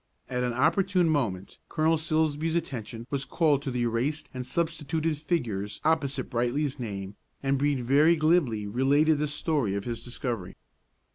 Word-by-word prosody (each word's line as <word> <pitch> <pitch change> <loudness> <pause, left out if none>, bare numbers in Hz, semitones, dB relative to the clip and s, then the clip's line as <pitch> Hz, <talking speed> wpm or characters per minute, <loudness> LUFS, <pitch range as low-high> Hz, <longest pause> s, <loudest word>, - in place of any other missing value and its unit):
At 125 -1 -2
an 125 -1 0
opportune 175 +7 +2
moment 110 -11 -1
Colonel 160 0 +2
Silsbee's 160 0 0
attention 120 -7 -4
was 140 -1 0
called 150 -2 +2
to 140 - -4
the 125 -1 -1
erased 140 +6 -1
and 130 -1 -4
substituted 160 +1 -1
figures 115 - -2
opposite 140 -5 +1
Brightly's 130 +4 -1
name 100 -4 -5 0.3
and 135 0 +1
Brede 145 -2 +1
very 145 +7 +5
glibly 155 -10 +2
related 140 +8 +3
the 150 - 0
story 145 - 0
of 100 - -2
his 115 0 -4
discovery. 120 -6 -4
140 Hz, 150 wpm, -28 LUFS, 120-155 Hz, 0.3 s, very